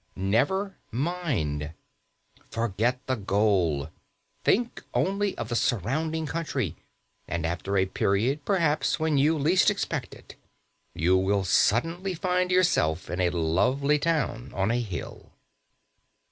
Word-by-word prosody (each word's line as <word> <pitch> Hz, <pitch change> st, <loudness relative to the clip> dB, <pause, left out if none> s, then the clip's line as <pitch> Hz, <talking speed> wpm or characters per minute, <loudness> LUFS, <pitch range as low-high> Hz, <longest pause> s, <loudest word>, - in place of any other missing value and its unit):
Never 145 Hz, -, 0 dB
mind. 115 Hz, -, -2 dB, 0.8 s
Forget 115 Hz, +3 st, -1 dB
the 130 Hz, -, 0 dB
goal; 95 Hz, -, +1 dB, 0.5 s
think 240 Hz, +3 st, +1 dB
only 200 Hz, +1 st, 0 dB
of 115 Hz, -1 st, -4 dB
the 120 Hz, -, -1 dB
surrounding 155 Hz, -, 0 dB
country; 145 Hz, -, -2 dB, 0.5 s
and 85 Hz, -1 st, -2 dB
after 90 Hz, +4 st, -2 dB
a 95 Hz, -, +3 dB
period, 110 Hz, +9 st, 0 dB
perhaps 165 Hz, -6 st, +1 dB
when 155 Hz, -3 st, +2 dB
you 155 Hz, +3 st, +3 dB
least 165 Hz, +6 st, +4 dB
expect -, -, -3 dB
it, -, -, -14 dB, 0.6 s
you 85 Hz, +4 st, +3 dB
will 95 Hz, +1 st, +1 dB
suddenly 165 Hz, -, +1 dB
find 180 Hz, +1 st, 0 dB
yourself 170 Hz, -, +2 dB
in 90 Hz, -, -1 dB
a 90 Hz, -, +3 dB
lovely 110 Hz, -, +1 dB
town 145 Hz, -7 st, -1 dB
on 95 Hz, +3 st, +1 dB
a 120 Hz, +1 st, +1 dB
hill. 95 Hz, -8 st, -7 dB
120 Hz, 120 wpm, -27 LUFS, -, 0.8 s, least